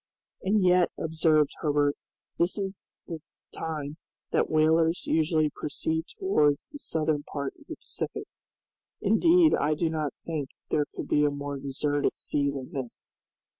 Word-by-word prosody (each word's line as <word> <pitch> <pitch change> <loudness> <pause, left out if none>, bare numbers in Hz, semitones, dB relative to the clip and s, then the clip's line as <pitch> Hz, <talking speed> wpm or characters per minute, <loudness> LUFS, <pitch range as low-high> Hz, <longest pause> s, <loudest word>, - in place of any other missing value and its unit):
"And 200 +1 +2
yet," 180 -1 +5
observed 160 -2 +2
Herbert, 145 -1 +2 0.4
"this 175 +4 +2
is 195 -1 -4 0.2
the 165 -3 -5 0.3
time 155 -2 -4 0.3
that - - +2
whalers 160 +2 +3
usually 155 -1 +2
proceed 160 +2 -2
towards 150 - +2
the 290 - -9
southern 155 - 0
part 140 -1 -4
of - - -19
the - - -6
Pacific. - - -5 0.7
Indeed 330 - +5
I 150 +1 +2
do 160 +1 0
not 155 -4 -2
think 150 -5 -3 0.2
there 150 -1 +2
could - - -6
be 150 - +3
a 145 - +4
more 140 0 -4
deserted 145 +1 0
sea 140 -1 0
than 140 +2 -5
this." 130 -6 -7
155 Hz, 145 wpm, -28 LUFS, 145-165 Hz, 0.7 s, yet